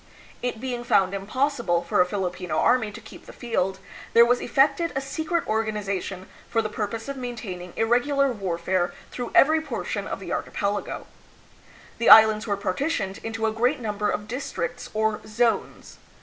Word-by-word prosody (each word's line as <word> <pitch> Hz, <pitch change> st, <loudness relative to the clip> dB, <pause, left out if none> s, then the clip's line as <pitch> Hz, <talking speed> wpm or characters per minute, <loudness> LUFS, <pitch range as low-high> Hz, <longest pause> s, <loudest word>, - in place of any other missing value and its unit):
It 245 Hz, -2 st, -3 dB
being 245 Hz, -1 st, -4 dB
found 195 Hz, -5 st, +3 dB
impossible 215 Hz, -3 st, 0 dB
for 175 Hz, -, +2 dB
a 180 Hz, -, +3 dB
Filipino 180 Hz, -4 st, -3 dB
army 225 Hz, -4 st, +3 dB
to 230 Hz, -, -9 dB
keep 220 Hz, -, -14 dB
the -, -, -9 dB
field, 190 Hz, -6 st, -2 dB, 0.4 s
there 235 Hz, 0 st, +8 dB
was 245 Hz, +1 st, +2 dB
effected 280 Hz, +6 st, +2 dB
a -, -, +1 dB
secret 315 Hz, +5 st, -2 dB
organization 200 Hz, -4 st, -2 dB, 0.2 s
for 225 Hz, -1 st, +1 dB
the 215 Hz, -, -2 dB
purpose 220 Hz, +3 st, -3 dB
of 275 Hz, 0 st, -5 dB
maintaining 220 Hz, -8 st, -6 dB
irregular 265 Hz, +5 st, +2 dB
warfare 185 Hz, -3 st, -1 dB, 0.2 s
through 245 Hz, -1 st, -5 dB
every 315 Hz, +3 st, +6 dB
portion 315 Hz, -, -4 dB
of -, -, -4 dB
the -, -, -5 dB
archipelago. 205 Hz, 0 st, -3 dB, 0.9 s
The 230 Hz, -, +3 dB
Islands 220 Hz, 0 st, +8 dB
were 200 Hz, -1 st, 0 dB
partitioned 200 Hz, -, -2 dB
into 225 Hz, 0 st, -3 dB
a 220 Hz, -, +2 dB
great 245 Hz, +6 st, +1 dB
number 210 Hz, -3 st, -2 dB
of 210 Hz, 0 st, -3 dB
districts 250 Hz, 0 st, -4 dB
or 220 Hz, 0 st, 0 dB
"zones." 230 Hz, +2 st, -1 dB
220 Hz, 160 wpm, -25 LUFS, 200-250 Hz, 0.9 s, there